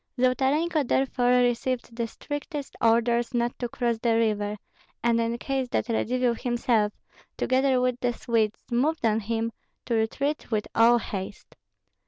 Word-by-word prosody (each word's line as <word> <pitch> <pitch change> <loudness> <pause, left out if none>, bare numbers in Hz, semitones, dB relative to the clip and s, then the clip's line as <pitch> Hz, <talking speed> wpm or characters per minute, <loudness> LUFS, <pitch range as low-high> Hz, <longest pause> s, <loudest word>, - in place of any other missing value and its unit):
Zolotarenko 275 +6 +2
therefore 250 -2 +2
received 245 0 -1
the 235 -1 -2
strictest 290 +4 -6
orders 235 +1 +2
not 240 0 0
to 245 - -2
cross 235 -2 -1
the 230 0 +2
river, 210 -2 0 0.5
and 235 -1 +3
in 230 +1 -1
case 265 +1 -2
that 240 - -1
Radzivill 245 +2 +1
himself, 235 -3 +1 0.5
together 260 0 +2
with 250 -1 0
the 245 - +1
Swedes, 225 -2 -1
moved 275 +4 +1
on 220 -1 +3
him, 225 +1 -2 0.3
to 240 - -2
retreat 275 +7 -1
with 215 -3 -1
all 235 +1 +6
haste. 195 -3 -6
240 Hz, 145 wpm, -26 LUFS, 230-255 Hz, 0.5 s, all